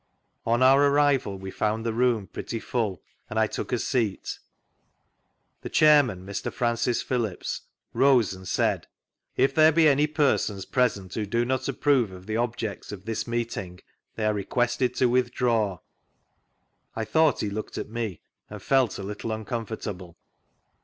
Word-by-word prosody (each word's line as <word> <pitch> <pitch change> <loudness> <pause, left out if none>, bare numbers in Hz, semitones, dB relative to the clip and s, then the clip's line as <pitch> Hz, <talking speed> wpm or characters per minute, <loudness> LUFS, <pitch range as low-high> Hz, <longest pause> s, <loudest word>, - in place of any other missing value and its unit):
On 120 +2 +3
our 135 +2 +6
arrival 140 -8 +2
we 95 0 -7
found 110 +3 -1
the 115 - 0
room 120 -3 +1
pretty 115 - -5
full 110 -6 -2 0.3
and 110 - -4
I 110 - +4
took - - -5
a 125 - +2
seat. 115 -5 -2 1.2
The - - -6
Chairman, 140 -12 +4
Mr. 100 0 -4
Francis 120 0 0
Phillips, 115 -7 -2 0.3
rose 125 -5 +4
and 95 0 -10
said: 95 - 0 0.5
"If 135 - +3
there 155 0 +6
be 160 0 +5
any 145 +1 +4
persons 135 -10 0
present 100 -8 0
who 105 -2 -2
do 115 +3 +1
not 130 +1 -1
approve 135 -5 +2
of 95 0 -11
the 110 +1 -3
objects 115 -4 -3
of 100 -2 -9
this 115 +1 -3
meeting 115 -6 -3 0.4
they 110 - -2
are 105 - +2
requested 120 +4 0
to - - +2
withdraw." 120 -5 +1 1.2
I 110 - -2
thought 160 +1 +3
he 105 - -2
looked 105 +2 -5
at - - -4
me, 110 -8 -4 0.3
and 105 - -8
felt 130 -1 +2
a 100 - -6
little 105 +3 -5
uncomfortable. 110 -5 -5
115 Hz, 155 wpm, -26 LUFS, 105-125 Hz, 1.2 s, our